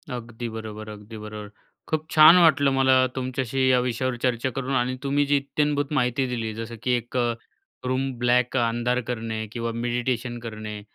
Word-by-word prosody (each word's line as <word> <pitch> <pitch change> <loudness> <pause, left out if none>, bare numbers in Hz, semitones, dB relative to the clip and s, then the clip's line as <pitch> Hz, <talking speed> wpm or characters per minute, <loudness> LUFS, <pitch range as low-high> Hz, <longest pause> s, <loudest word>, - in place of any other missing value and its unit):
अगदी 120 0 -6
बरोबर, 110 -1 -7
अगदी 105 +1 -10
बरोबर. 105 -1 -8 0.4
खूप 155 0 -2
छान 155 +3 +9
वाटलं 145 -5 +5
मला 130 0 +4 0.2
तुमच्याशी 130 0 -1
या 125 -1 +5
विषयावर 125 +1 -1
चर्चा 125 0 +1
करून 135 0 -2
आणि 125 0 0
तुम्ही 145 +1 +1
जी 145 0 +3
इत्थंभूत 145 +1 -1
माहिती 125 -1 +1
दिली, 115 -3 -3
जसं 115 +1 -6
की 125 - +1
एक 120 +2 -6 0.7
रूम 130 +1 0
ब्लॅक 125 +1 +2
अंधार 120 +1 +1
करणे 110 -2 -3
किंवा 115 0 -3
मेडिटेशन 120 +1 -2
करणे 110 -2 -7
125 Hz, 160 wpm, -25 LUFS, 115-135 Hz, 0.7 s, छान